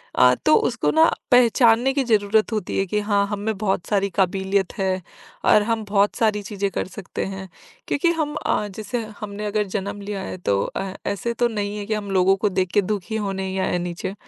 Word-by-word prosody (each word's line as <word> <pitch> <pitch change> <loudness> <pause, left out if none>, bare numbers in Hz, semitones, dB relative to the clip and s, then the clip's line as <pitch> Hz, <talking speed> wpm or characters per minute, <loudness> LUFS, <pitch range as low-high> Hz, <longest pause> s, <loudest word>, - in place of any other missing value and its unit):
अ, 125 0 +6
तो 155 - +6
उसको 240 - +1
ना 320 +1 +5 0.2
पहचानने 245 0 +5
की 275 0 +1
ज़रूरत 215 -1 +2
होती 210 -4 -2
है 195 - +1
कि 210 +3 0
हाँ 205 -1 +2
हमें 205 +1 -3
बहुत 195 -3 -1
सारी 200 -1 +1
काबिलियत 190 0 +1
है। 190 -1 0 0.4
और 210 - +6
हम 225 0 -1
बहुत 205 0 +2
सारी 215 -2 +1
चीज़ें 200 -1 -2
कर - - -3
सकते 190 0 -5
हैं। 190 -1 -7 0.4
क्योंकि 335 +4 +2
हम 310 -3 -2
अ, - - +2
जैसे 210 +4 -4 0.2
हमने 210 -1 -5
अगर 210 0 0
जन्म 200 +1 -4
लिया 200 -1 -4
है 185 - -6
तो 100 - 0
अ, 195 -1 -4
ऐसे 235 +4 -2
तो 240 +1 +2
नहीं 205 -2 -3
है 205 - -5
कि 220 - -2
हम 205 -2 -3
लोगों 190 0 +4
को 210 +2 +1
देख 185 -1 0
के 205 - +5
दुखी 210 +2 -3
होने 190 -1 -3
ही 190 - -4
आए - - 0
नीचे। 175 +2 -4
205 Hz, 210 wpm, -22 LUFS, 190-220 Hz, 0.4 s, अ